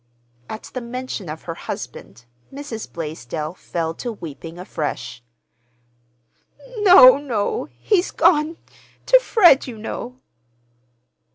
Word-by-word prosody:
At 220 - -7
the 255 - -4
mention 235 -6 -6
of 155 +1 -7
her 165 - -5
husband, 120 -6 -8 0.3
Mrs. 270 -6 -7
Blaisdell 155 -1 -5
fell 165 -3 -4
to 240 +8 -5
weeping 165 -4 -9
afresh. 150 -8 -5 1.6
"No, 360 -11 +8
no! 275 - -2
He's 390 -4 +1
gone—to 325 +9 +1
Fred, 360 - +5
you 240 -3 -7
know." 240 +3 -6
225 Hz, 100 wpm, -21 LUFS, -, 1.6 s, No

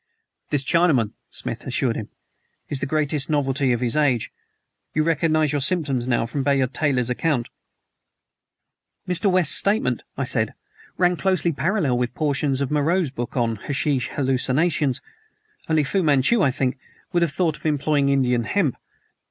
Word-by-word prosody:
"This 145 -2 0
Chinaman," 145 -9 +2 0.2
Smith - - -5
assured - - 0
him, - - -5 0.6
"is 140 - -1
the - - -2
greatest 150 -1 -1
novelty 140 -3 +1
of 120 0 0
his 120 +1 0
age. 135 -7 +1 0.6
You 155 - +3
recognize 155 -2 +2
your 145 -1 0
symptoms 140 -6 0
now 120 -2 +1
from 130 +5 -3
Bayard 135 -2 +1
Taylor's 130 -5 0
account?" 125 -3 0 1.6
"Mr. 180 +3 +2
West's 180 -5 +3
statement," 215 +6 +1 0.2
I - - -1
said, - - 0 0.4
"ran 180 -1 +2
closely 185 -2 +1
parallel 160 - 0
with 125 -1 -2
portions 140 -2 0
of 140 - -2
Moreau's 155 +1 +1
book 120 0 -5
on 115 -2 0
'Hashish 135 +1 -1
Hallucinations.' 135 +1 0 0.7
Only 155 -1 +3
Fu 190 +7 0
Manchu, 150 - +3
I 140 - +4
think, 130 0 -1 0.3
would 175 - +2
have 170 -3 +1
thought 160 0 0
of - - -21
employing 145 -1 +1
Indian 125 -4 +2
hemp. 155 - 0
145 Hz, 150 wpm, -23 LUFS, 130-160 Hz, 1.6 s, I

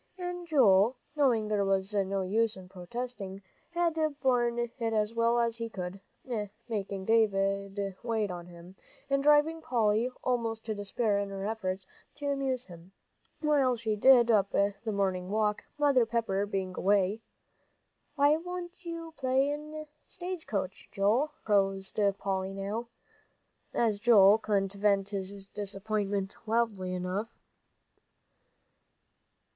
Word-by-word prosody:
And 355 -1 -5
Joel, 230 - +5 0.2
knowing 245 -7 +2
there 210 -1 +1
was 195 +1 0
no 195 -1 0
use 220 +3 +1
in 185 -1 -11
protesting, 195 +1 -6 0.3
had 340 -1 0 0.2
borne 240 -3 +2
it 240 -1 -1
as 220 -1 +1
well 230 +1 +2
as 230 -1 +1
he 230 -1 -4
could, 185 -2 -6 0.7
making 200 -4 -3
Davie 200 -2 +1
wait 220 -4 -1
on 175 -1 -7
him, 175 +1 -13 0.4
and 275 0 +3
driving 300 +3 +4
Polly 230 -3 +1
almost 230 -3 -1
to 220 - -2
despair 205 +1 0
in 200 0 -2
her 195 0 -5
efforts 195 -3 -3 0.3
to 290 - -7
amuse 270 -3 -1
him, 175 +1 -14 0.5
while 285 -5 +3
she 220 -2 -1
did 240 +1 +6
up 200 -3 +3
the 200 0 +2
morning 190 -3 0
work, 210 0 0
Mother 280 -5 +4
Pepper 210 -4 0
being 190 -2 -3
away. 200 +2 +2 0.9
"Why 285 0 +5
don't 355 0 -7
you 335 -1 -6
play 290 +4 -1 0.2
stage 360 -2 -6
coach, 195 -3 -4
Joel?" 215 +8 +2 0.2
proposed 195 -1 +1 0.2
Polly 190 -1 -2
now, 205 +4 -3 0.8
as 220 -4 +1
Joel 210 -2 +7
couldn't 200 -3 0
vent 200 -1 +2
his 195 0 -4
disappointment 200 -1 -2
loudly 215 -5 0
enough. 185 +5 -3
215 Hz, 130 wpm, -30 LUFS, 195-245 Hz, 0.9 s, Joel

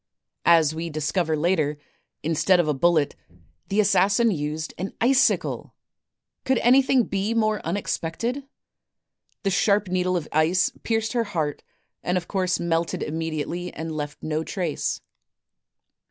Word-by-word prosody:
As 165 -3 +5
we 165 +1 -4
discover 155 +1 -1
later, 155 -2 +1 0.5
instead 165 +4 +3
of 170 - +2
a 150 - +2
bullet, 155 0 +2 0.5
the 200 - 0
assassin 200 +3 +4
used 155 -1 -3
an 190 +2 -4
icicle! 260 +3 +2 0.7
Could 265 -1 +2
anything 260 +1 +5
be 200 +2 -2
more 215 -2 +1
unexpected? 205 - -2 1.0
The 195 - +1
sharp 200 0 +2
needle 180 0 +1
of 160 - -4
ice 160 +4 +2
pierced 225 0 -1
her 235 -2 +1
heart 160 -8 -2 0.4
and 180 +1 0
of 175 -1 -4
course 185 -2 0
melted 170 -1 -1
immediately 165 +2 -3
and 160 0 -5
left 145 -1 -5
no 155 0 -1
trace. 170 -4 -2
175 Hz, 130 wpm, -24 LUFS, 160-200 Hz, 1.0 s, As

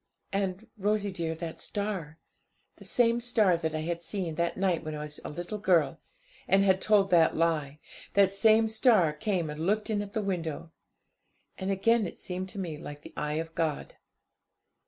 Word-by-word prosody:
And, 195 +1 -1
Rosie 205 0 0
dear, 165 -3 -3
that 165 0 -6
star 195 -7 -4 0.6
the - - -13
same 235 -1 +3
star 220 -7 +3
that 160 -1 -2
I 155 - -1
had 170 +1 -3
seen 175 -1 -3
that 170 +2 -1
night 185 -4 +1
when 155 -1 -5
I 150 - -5
was 150 0 -7
a - - -5
little 175 +7 -5
girl, 180 -6 +2 0.5
and 195 +1 +4
had 190 -1 +3
told 205 -2 +3
that 165 -2 +4
lie 155 -3 0 0.4
that 200 -1 +5
same 220 +2 +4
star 220 -7 +4
came 175 +1 -1
and 155 +3 -4
looked 215 +2 +1
in 205 -1 0
at 205 -1 -7
the 220 -2 -1
window. 165 -4 -3 0.8
And 190 0 -4
again 210 +2 +2
it - - -9
seemed 185 +1 -5
to 210 - -8
me 165 -5 -4
like 145 0 -9
the - - -11
eye 150 0 -2
of 165 +1 -4
God. 160 -3 -2
185 Hz, 185 wpm, -29 LUFS, 160-205 Hz, 0.8 s, that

